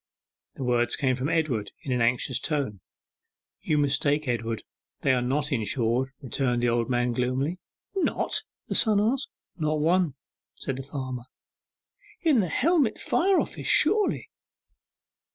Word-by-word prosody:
The - - -5
words 120 -1 +2
came 130 -2 +1
from 130 +3 -2
Edward 140 -11 0
in 135 - -4
an 125 -1 +1
anxious 125 +2 +1
tone. 140 - -2 0.8
'You 150 - +1
mistake, 145 +1 +1
Edward; 115 -2 -2 0.4
they 135 - +3
are 125 - +2
not 140 +4 -1
insured,' 120 +1 +1
returned 125 -2 -1
the 120 - +3
old 120 +1 0
man 120 0 +1
gloomily. 130 +8 -1 0.4
'Not?' 385 - +1 0.3
the - - -2
son 215 -3 +4
asked. 245 +6 +1 0.3
'Not 155 -2 0
one!' 165 -1 +2 0.4
said 135 - -4
the - - -4
farmer. 130 -3 -5 1.0
'In 310 -8 +4
the 185 -5 +1
Helmet 290 - +2
Fire 385 +1 +2
Office, - - -3
surely? 425 -1 +3
135 Hz, 140 wpm, -27 LUFS, 125-160 Hz, 1.0 s, son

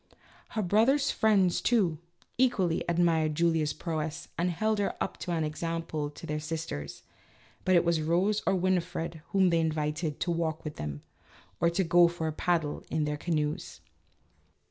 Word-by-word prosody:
Her 215 - +2
brother's 240 +10 +3
friends, 195 -5 +3
too, 190 -10 +2 0.4
equally 195 -10 +2
admired 165 -3 +2
Julia's 160 -2 +2
prowess 160 -2 -4
and 175 +2 0
held 215 +5 0
her 200 - 0
up - - -3
as - - -6
an 170 -2 0
example 155 -1 -3
to 145 - -11
their 150 0 -2
sis 160 +1 -4
ters, 70 - -7 0.6
but 185 -1 +3
it 175 - +4
was 170 -2 +2
Rose 180 +7 +1
or - - +4
Winifred 175 -3 -1
whom 190 -2 +3
they 170 - +3
invited 155 0 -1
to 175 - 0
walk 165 -2 -1
with 150 -1 -6
them, 75 -1 -5 0.6
or 170 - +3
to 180 +3 0
go 175 0 +6
for 170 -1 -4
a 155 - -2
paddle 165 -2 -1
in 155 -1 0
their 150 0 -1
canoes. 150 - -2
165 Hz, 165 wpm, -29 LUFS, 155-180 Hz, 0.6 s, go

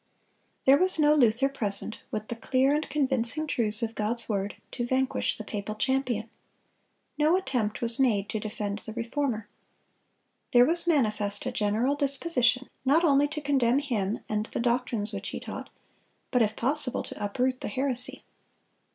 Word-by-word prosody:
There 275 +2 +6
was 370 -1 +6
no 300 -1 +4
Luther 250 -2 +3
present, 215 -6 +1
with 215 0 -5
the 235 - -3
clear 260 +4 +1
and 300 +1 -2
convincing 270 0 0
truths 230 -6 +3
of 225 0 -2
God's 230 +2 -2
word, 200 -2 -2 0.2
to 245 - -4
vanquish 260 +2 0
the 220 - -6
papal 210 0 -5
champion. 250 -2 -1 0.9
No 310 +4 +4
attempt 250 - -2
was 230 +1 0
made 215 -7 +2
to 220 - -2
defend 210 -1 -4
the 220 - -9
Reformer. 235 -2 -3 1.1
There 245 0 +7
was 340 +4 +4
manifest 210 -10 +1
a 255 - -2
general 220 +4 0
disposition 270 -3 +2 0.2
not 290 +6 +3
only 290 -3 +4
to 300 +1 -5
condemn 270 -4 +2
him 230 -8 -2
and 215 +1 -2
the - - -5
doctrines 235 -3 -1
which 200 0 -4
he - - -5
taught, - - -8 0.6
but 250 - +2
if 215 -1 +1
possible 265 0 0
to 210 - -8
uproot 255 +5 -1
the - - -3
heresy. 255 +2 -3
245 Hz, 160 wpm, -27 LUFS, 215-275 Hz, 1.1 s, There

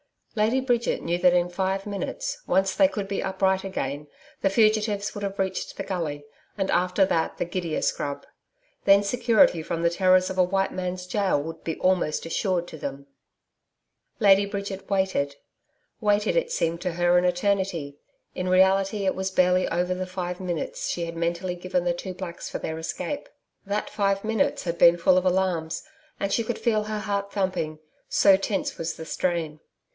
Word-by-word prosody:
Lady 225 +5 +2
Bridget 245 -3 0
knew 170 +1 0
that 180 0 +5
in 175 0 +2
five 190 +2 -1
minutes, - - -4
once 190 0 +2
they 285 - +5
could 205 -8 -4
be 200 0 -2
upright 190 0 0
again, 145 -6 -4 0.3
the 195 - +3
fugitives 215 -1 +2
would 205 - -6
have 200 0 -3
reached 190 -1 -2
the - - -4
gully, 160 -6 -3 0.3
and 195 -1 0
after 180 +2 +3
that 165 -3 -1
the - - -1
gidia 170 -2 -3
scrub. 145 -1 -2 0.6
Then 200 0 +6
security 235 - +3
from 165 +1 -3
the 170 - +4
terrors 185 +1 +4
of 190 - -6
a - - +7
white 195 +2 0
man's 180 0 -4
gaol 185 -6 0
would 165 +1 -8
be 160 - -2
almost 180 -5 +1
assured 175 +1 -1
to - - -9
them. 140 -1 -6 1.1
Lady 200 -2 +6
Bridget 200 -1 -5
waited 190 -8 0 0.6
waited, 210 -1 +2
it - - +1
seemed 165 - -1
to 180 -2 -2
her 175 +1 +3
an 180 - +3
eternity, 180 -5 0 0.3
in 180 - -3
reality 195 +2 +3
it 190 - +2
was 190 0 -2
barely 180 0 +3
over 180 +2 0
the 185 0 -4
five 180 -1 -4
minutes 175 -4 -3
she 170 - -2
had 165 0 -6
mentally 170 +2 -2
given 180 0 -1
the 175 -1 +1
two 185 +2 -6
blacks 180 -2 -7
for - - -3
their 160 0 -4
escape. 285 - -4 0.4
That 205 +1 -2
five 200 -2 0
minutes 220 -2 0
had 170 -1 -3
been 170 0 +7
full 180 +2 +4
of 185 - +1
alarms, 180 -3 0 0.4
and 200 - -1
she 230 - +2
could 235 +2 -3
feel 215 -3 +1
her 215 0 -3
heart 200 -1 -3
thumping, 185 -6 -1 0.3
so 195 -1 +5
tense 195 0 -2
was 165 0 -3
the 160 - -8
strain. 165 -3 -2
185 Hz, 180 wpm, -25 LUFS, 175-200 Hz, 1.1 s, a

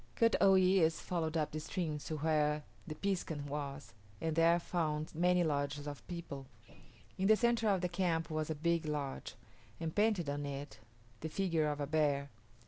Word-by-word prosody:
Kut 230 -1 +4
o 195 0 +7
yis´ 185 -3 +5
followed 165 -1 -2
up 155 -2 0
the 155 - -3
stream 155 -1 -3
to 155 +1 -4
where 150 -1 +1 0.2
the 155 - -5
piskun 175 -7 -2
was 140 0 -5 0.3
and 160 -1 -1
there 165 +1 +5
found 155 -3 -2
many 180 +2 +3
lodges 145 -2 -1
of 145 -1 -7
people. 165 -6 -6 0.7
In 190 - +2
the 220 - +7
centre 235 -1 +2
of 195 -3 +2
the 180 - +1
camp 170 -3 0
was 155 0 -1
a 160 - -1
big 165 +1 0
lodge, 145 -3 -3 0.4
and 165 -1 -3
painted 210 -6 +2
on 145 +1 -2
it 140 +1 -6 0.4
the 160 - -4
figure 165 -3 +1
of 150 -1 -2
a 145 - 0
bear. 140 -2 +1
160 Hz, 180 wpm, -35 LUFS, 150-180 Hz, 0.7 s, o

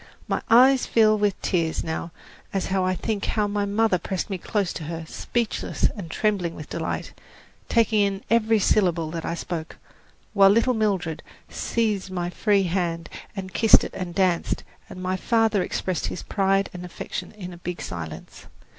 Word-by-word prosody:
My - - -1
eyes 255 +3 +6
fill 215 -2 +5
with 205 -2 0
tears 165 -3 0
now 160 +1 -4 0.4
as 195 -1 -1
I 185 -1 +1
think 205 +2 -2
how 210 -2 +1
my 205 0 -1
mother 205 -2 +2
pressed 190 +3 -3
me 190 - -2
close 200 0 -1
to 160 - -6
her, 165 +1 -5
speechless 235 +5 -1
and 190 -6 -7
trembling 185 -3 0
with 150 - -9
delight, 165 -1 -3 0.6
taking 225 -2 +3
in 200 0 0
every 225 -1 +3
syllable 175 -6 +2
that 165 -1 -4
I 170 - -2
spoke, 165 -2 -5 0.6
while 195 -2 +7
little 230 +5 +4
Mildred 195 -8 0 0.3
seized 215 -5 -1
my 175 -1 -3
free 205 0 +2
hand 170 -2 -1 0.3
and 190 -1 -6
kissed 225 -2 +6
it - - -6
and 180 -2 -5
danced, 185 -3 +1 0.3
and 185 - -8
my 185 +1 0
father 225 -2 +2
expressed 185 0 -2
his - - -5
pride 195 -1 +1
and 180 0 -7
affection 180 0 -6
in 185 -4 -8
a - - -10
big 175 0 -5
silence. 80 -3 -7
190 Hz, 170 wpm, -24 LUFS, 175-210 Hz, 0.6 s, while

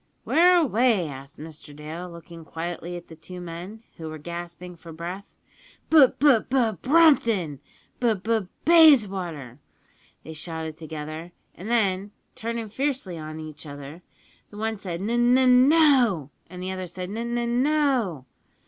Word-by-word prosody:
"`Where 355 +2 +5
away?' 235 - +2
asked 140 0 -10
Mr 155 -1 -11
Dale, 160 +4 -7
looking 170 -1 -12
quietly 170 +2 -6
at 175 - -12
the 165 - -12
two 180 +3 -10
men, 175 +6 -8
who 160 -1 -7
were 155 - -7
gasping 175 +2 -8
for 165 0 -12
breath. 175 +5 -7 0.6
"`B 295 -6 +6
B 280 -5 +5
B 245 -4 +2
Brompton,' 230 - +3 0.4
`B 225 -6 0
B 225 0 +1
B 195 - -9 0.2
Bayswater!' 195 - +4 0.6
they 160 - -9
shouted 160 0 -6
together; 155 +1 -8 0.2
and 195 +5 -9
then, 200 -3 +1 0.2
turnin' 230 -1 -5
fiercely 255 - -3
on 155 0 -7
each 155 0 -9
other, 145 +3 -9 0.5
the 205 - -13
one 220 -1 -2
said 175 -3 -5
`N 210 +4 -2
N 240 +1 +4
N 255 0 +5
No!' 255 - +4 0.2
and 180 +1 -8
the 185 - -3
other 185 -1 -5
said 180 +1 -7
`N 210 - -6
N 235 +1 -2
N 240 +1 0
No!' 260 - +1
185 Hz, 155 wpm, -25 LUFS, 160-240 Hz, 0.6 s, `B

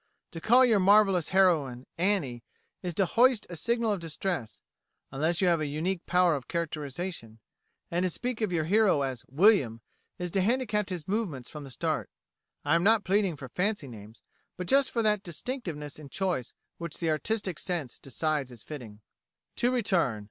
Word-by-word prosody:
To 165 - -8
call 250 +6 +6
your 225 -4 +4
marvellous 195 -3 +4
heroine 155 -10 +2
"Annie" 165 - 0 0.4
is 175 -3 -4
to 195 - +3
hoist 240 +4 +3
a - - -5
signal 230 +6 0
of 200 - -1
distress, 160 - -4 0.5
unless 160 +6 0
you 185 - +3
have 170 -2 +3
a 150 - -1
unique 165 +5 -2
power 180 -2 +4
of 135 - -6
characterisation; 155 -6 -4 0.5
and 175 +1 0
to 185 - +1
speak 245 +6 -3
of 215 -4 0
your 165 -3 +1
hero 195 -5 +3
as 130 -3 -4
"William" 140 - +3 0.4
is 180 -1 -4
to 195 - +1
handicap 210 -1 0
his 175 -5 -5
movements 185 - -2
from 150 -2 -8
the - - -10
start. 125 - -2 0.6
I - - +2
am 170 - +4
not 220 +1 +4
pleading 195 -3 +1
for 135 -3 -9
fancy 190 - -1
names, 110 -2 -12 0.3
but 180 - -4
just 275 +7 +3
for 230 - -1
that 210 -2 +3
distinctiveness 170 - -5
in 145 -2 -11
choice 175 -8 -2 0.2
which 170 -2 -5
the 165 -2 0
artistic 190 +1 -2
sense 165 -9 -3
decides 150 0 -2
is 120 -3 -10
fitting. 115 -8 -9 0.6
To 245 - +2
return. 185 - +1
175 Hz, 175 wpm, -29 LUFS, 145-205 Hz, 0.6 s, call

